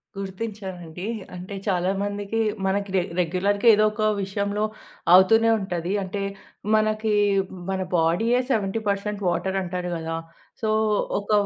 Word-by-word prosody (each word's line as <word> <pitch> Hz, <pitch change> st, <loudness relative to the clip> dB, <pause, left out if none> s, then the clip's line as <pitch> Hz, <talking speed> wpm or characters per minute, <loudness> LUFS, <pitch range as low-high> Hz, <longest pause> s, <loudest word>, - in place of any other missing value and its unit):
గుర్తించానండి. 190 Hz, -3 st, -6 dB, 0.3 s
అంటే 185 Hz, +3 st, -7 dB
చాలా 180 Hz, -1 st, +1 dB
మందికి 205 Hz, +2 st, -2 dB, 0.3 s
మనకి 200 Hz, +1 st, 0 dB
రె 185 Hz, -, +4 dB, 0.2 s
రెగ్యులర్‌గా 195 Hz, +6 st, +1 dB
ఏదోక 215 Hz, +1 st, +2 dB, 0.2 s
విషయంలో 200 Hz, +2 st, -1 dB, 0.5 s
అవుతూనే 225 Hz, +5 st, +6 dB
ఉంటది. 180 Hz, -2 st, -3 dB
అంటే, 195 Hz, +2 st, -4 dB, 0.5 s
మనకి 215 Hz, 0 st, +1 dB, 0.6 s
మన 190 Hz, 0 st, -1 dB, 0.2 s
బాడీయే 190 Hz, +10 st, +2 dB
70% 205 Hz, -1 st, -1 dB
వాటర్ 190 Hz, +2 st, -1 dB
అంటారు 180 Hz, 0 st, -3 dB
కదా! 165 Hz, 0 st, -4 dB, 0.5 s
సో, 220 Hz, -, 0 dB, 0.5 s
ఒక 200 Hz, -, -6 dB
200 Hz, 110 wpm, -24 LUFS, 185-215 Hz, 0.6 s, అవుతూనే